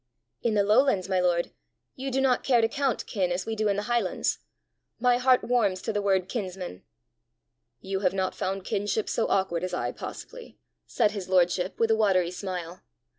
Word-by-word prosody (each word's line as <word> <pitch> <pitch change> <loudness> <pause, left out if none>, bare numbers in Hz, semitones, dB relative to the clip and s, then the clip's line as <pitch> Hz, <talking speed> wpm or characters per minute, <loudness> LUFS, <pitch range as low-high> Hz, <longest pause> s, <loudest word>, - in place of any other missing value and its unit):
"In 230 -2 0
the 205 - +4
lowlands, 210 -2 +3
my 190 -1 +1
lord, 175 -1 +1 0.4
you 270 +1 -4
do 265 0 0
not 260 -2 +2
care 250 -3 +4
to 225 - +3
count 270 0 -1
kin 185 -4 -1
as 175 +1 -2
we 225 - -3
do 215 0 0
in 200 - +2
the 205 - -2
highlands! 235 -4 0 0.6
My 245 0 +3
heart 255 0 +4
warms 215 -7 +1
to 220 - -2
the 205 - 0
word 190 -2 +1
kinsman." 185 - -5 1.0
"You 190 0 -3
have 185 -2 +1
not 190 -1 -1
found 195 0 -3
kinship 205 +1 -1
so 230 - 0
awkward 185 -3 0
as 185 - -2
I, - - -2
possibly!" 485 -1 -9 0.3
said 210 - +2
his 195 -3 -6
lordship, 180 0 +2
with 225 -1 +3
a - - +5
watery 190 -5 +2
smile. 180 -2 -6
200 Hz, 190 wpm, -27 LUFS, 185-230 Hz, 1.0 s, a